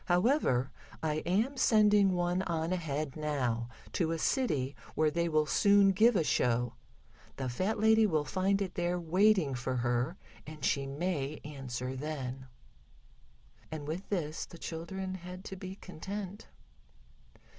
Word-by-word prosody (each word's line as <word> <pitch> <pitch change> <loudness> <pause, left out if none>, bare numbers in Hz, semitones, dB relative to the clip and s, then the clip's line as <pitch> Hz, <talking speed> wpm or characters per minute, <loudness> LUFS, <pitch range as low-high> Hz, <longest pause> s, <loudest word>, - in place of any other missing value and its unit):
However, 175 - +2 0.3
I 155 -1 0
am 220 +10 +1
sending 210 -5 +5
one 175 +1 +1
on 165 -1 -1
ahead 155 -5 -2
now, 125 -7 -1 0.2
to 165 -3 +1
a - - -1
city 150 - 0 0.2
where 155 -1 +3
they 170 +1 0
will 155 -1 +3
soon 200 +6 +5
give 220 +5 +4
a 170 - +3
show. 120 -4 +1 0.6
The 130 - -3
fat 185 - -1
lady 220 0 +5
will 155 -5 +1
find 195 +6 +1
it 190 - -6
there 175 0 0
waiting 180 -2 +3
for 130 +1 -2
her, 120 0 0 0.3
and 155 -2 -6
she 140 -1 +1
may 150 -1 -2
answer 130 -3 -5
then." 130 -2 -5 1.2
And 150 -2 -5
with 170 +6 -5
this 165 -6 -2
the 170 - -12
children 185 +4 -5
had 180 +1 -8
to 195 - -6
be 190 0 -7
content. 195 +2 -7
165 Hz, 145 wpm, -32 LUFS, 140-190 Hz, 1.2 s, sending